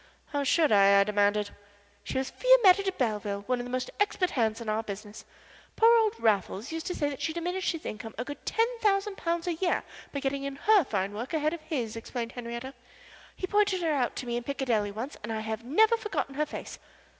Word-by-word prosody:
"How 285 -2 -1
should 305 +2 +3
I?" 200 -1 +6
I - - +6
demanded. 205 0 +1 0.5
"She - - -4
was 265 0 -2
Fiametta 465 -7 +6
de 390 -1 -1
Belleville, 210 - -2
one 250 +2 0
of 245 - -4
the - - -7
most 255 0 -3
expert 395 -3 +1
hands 225 -3 0
in 230 - -8
our 215 +1 0
business. 210 0 -8 0.5
Poor 460 +1 +6
old 440 0 +1
Raffles 210 - 0
used 325 0 -4
to 360 - -2
say 290 - 0
that 275 - -7
she 320 - -1
diminished 355 +3 -1
his 330 -2 -7
income 220 +1 -6
a 245 - -3
good 290 +2 -8
ten 455 - +2
thousand 405 -1 +1
pounds 335 0 -1
a 350 - 0
year 350 +2 0 0.3
by 280 - -3
getting 275 0 -2
in 275 0 -4
her 415 +5 +4
fine 195 -6 -2
work 240 +9 -4
ahead 305 +1 +1
of 340 - -6
his," 245 -9 -3
explained 230 +1 -5
Henriette. 240 +2 -6 0.6
"He - - -3
pointed 400 -2 +2
her 320 -2 +2
out 255 -4 0
to 255 - -5
me 240 0 -2
in 240 - -4
Piccadilly 240 -6 0
once 225 +7 -6
and 215 - -5
I 220 -1 -2
have 220 +1 -4
never 430 - +4
forgotten 425 -10 -3
her 300 +2 -1
face." - - -7
270 Hz, 225 wpm, -28 LUFS, 220-350 Hz, 0.6 s, I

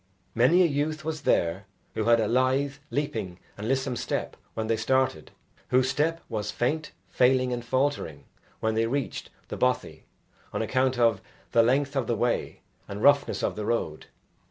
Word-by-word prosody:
Many 150 +11 +5
a - - +5
youth 155 +1 -1
was 155 -1 -3
there 95 - +1 0.3
who 110 - -2
had 115 0 +5
a 110 - +1
lithe, 130 +4 +2 0.2
leaping 110 -11 -3 0.2
and 105 +2 -6
lissom 130 0 0
step - - -3 0.2
when 110 - -2
they 115 +1 +1
started 110 -7 0 0.4
whose 130 +1 +3
step 165 +4 0
was 110 -3 -3
faint, 155 +6 -1 0.2
failing, 130 0 +2
and 120 -1 -4
faltering 130 - -1 0.4
when 110 0 +1
they 115 +1 +1
reached 135 +2 -3 0.2
the - - -5
bothy 125 0 -1 0.5
on - - -1
account 130 +3 +1
of 115 -5 +3 0.3
the 115 - +5
length 135 +4 +1
of 130 -4 0
the 120 - +1
way 120 +2 -1 0.3
and 100 +2 -6
roughness 140 0 +4
of - - 0
the 105 - -4
road. 80 -10 -2
125 Hz, 170 wpm, -27 LUFS, 110-140 Hz, 0.5 s, Many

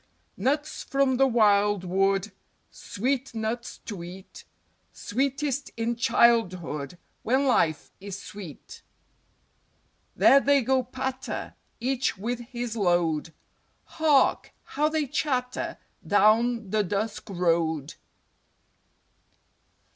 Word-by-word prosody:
Nuts 290 +8 -1
from 275 -2 +1
the 270 +1 +5
wild 205 -4 +3
wood; 195 +2 +1 0.4
Sweet 255 +3 -3
Nuts 225 +2 -3
to 200 -6 -6
eat; 185 +2 -11 0.5
Sweetest 275 +3 -2
in 230 +1 -1
Childhood 185 - +1 0.2
When 260 +5 +1
life 160 - +1
is 200 -1 -6
sweet. 200 -8 -10 1.3
There 275 - +6
they 280 -1 +3
go 260 +2 +2
patter, 260 +1 -5 0.3
Each 255 -1 -1
with 235 +5 -3
his 240 -1 -5
Load; 175 -6 +1 0.5
Hark! 300 -4 +2
how 300 +1 0
they 310 -1 0
chatter 255 -2 -2 0.3
Down 220 +1 +3
the 215 0 +2
dusk 205 +3 -3
Road. 165 -5 0
230 Hz, 95 wpm, -26 LUFS, 195-260 Hz, 1.3 s, There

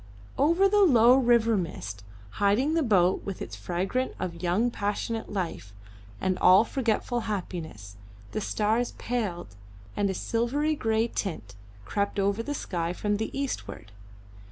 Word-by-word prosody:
Over 335 +7 +4
the 415 +1 +3
low 245 - +6
river 235 -3 +3
mist 105 - -4 0.4
hiding 220 +10 +3
the 330 - +2
boat 190 - +3
with 195 -2 -5
its - - -6
freight 180 +2 -3 0.3
of 170 -2 -5
young 195 +8 +1
passionate 220 +2 -3
life 170 - -4 0.5
and 185 -1 -1
all 185 +4 +7
forgetful 240 0 -1
happiness, 160 - -5 0.3
the 215 - -3
stars 220 +4 0
paled, 185 - -4 0.4
and 205 -1 +1
a 190 - -2
silvery 265 +10 0
grey 225 -3 +1
tint 160 - -4 0.3
crept 200 - -2
over 200 +2 +1
the 290 +5 -4
sky 170 -8 -3
from 205 +2 -1
the 220 - -2
eastward. 250 - -5
210 Hz, 140 wpm, -27 LUFS, 180-240 Hz, 0.5 s, all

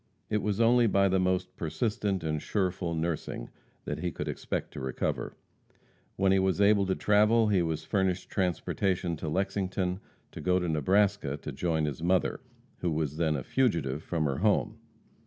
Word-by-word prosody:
It 105 -1 +1
was 105 0 -1
only 120 +1 +5
by 100 -1 +3
the 95 0 +2
most 90 0 0
persistent 100 +2 -1
and 75 -2 -1
sureful 90 -4 -1
nursing 80 -6 -3 0.4
that - - -3
he 90 - -1
could - - -5
expect - - -4
to - - -6
recover. 65 -1 -3 0.8
When 95 0 +2
he 95 - +4
was 95 0 +1
able 100 -1 +4
to 95 - +1
travel 105 +2 +4
he 95 -3 +3
was 80 -2 -2
furnished 95 0 0
transportation 90 -1 -1
from 75 0 -4
Lexington 95 -1 -1 0.3
to - - -8
go 90 0 +2
to 90 -1 -1
Nebraska 95 0 +1
to - - -7
join 80 -3 0
his 75 -1 -4
mother, 90 +2 +1 0.4
who 90 - 0
was 75 -2 -2
then 80 -2 +1
a 65 - -3
fugitive 85 - 0
from 80 -1 -1
her 70 -1 -1
home. 105 +1 +1
90 Hz, 175 wpm, -29 LUFS, 80-100 Hz, 0.8 s, only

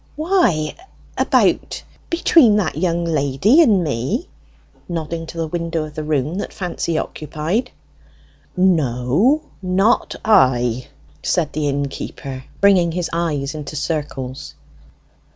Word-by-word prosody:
"Why 280 - +1 0.4
about - - +1 0.3
between 325 -9 +5
that 200 -6 0
young 170 +1 0
lady 155 - +3
and 210 - +4
me?" 145 - -2 0.6
nodding 165 -1 -4
to 165 - -9
the 165 - -1
window 165 0 -2
of 155 -1 -8
the 155 - -5
room 150 +3 -1
that - - -4
Fancy 175 -4 -3
occupied. 160 - -2 0.9
"No; 175 - +2 0.2
not 195 +5 +1
I!" 125 - +3 0.3
said 165 -5 0
the 150 -1 -1
innkeeper, 140 -1 -5 0.2
bringing 190 -4 +5
his 175 -1 -2
eyes 150 -4 -1
into 150 -1 -7
circles. 135 - -4
165 Hz, 115 wpm, -20 LUFS, 145-190 Hz, 0.9 s, between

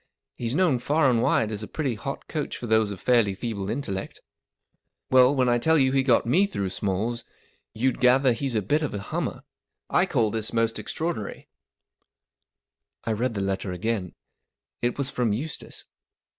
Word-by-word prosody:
He's 120 +2 -2
known 160 -8 +3
far 145 +1 +3
and 115 -2 +2
wide 110 -1 +2
as 105 -1 -3
a 105 - -5
pretty 140 -6 -2
hot 135 +5 -6
coach 150 -3 -3
for - - -6
those 110 -2 +3
of 100 -3 -6
fairly 115 -5 +3
feeble 100 -2 -4
intellect. 100 -7 -4 0.9
Well, 130 +2 +6
when 130 -2 +3
1 120 -1 +3
tell 160 +6 +3
you 130 -2 +3
he 135 0 +3
got 130 -3 +3
me 180 +12 +3
through 100 - -3
Smalls* 105 +5 -2 0.5
you'll 130 +4 +2
gather 130 +2 +4
that 115 - -2
he's 135 -4 -1
a 105 - +1
bit 150 +11 +1
of 150 -8 -2
a - - -3
hummer, 100 - -4 0.5
I 180 - +3
call 115 - +1
this 110 0 -2
most 115 -1 +1
extraordinary/* 135 +2 -4 1.6
I 115 - 0
read 115 +2 -1
the 100 - -1
letter 95 0 -2
again. 95 0 -2 0.7
It 120 0 0
was 140 -1 -2
from 120 -4 0
Eustace. 150 +9 -5
120 Hz, 180 wpm, -26 LUFS, 105-135 Hz, 1.6 s, Well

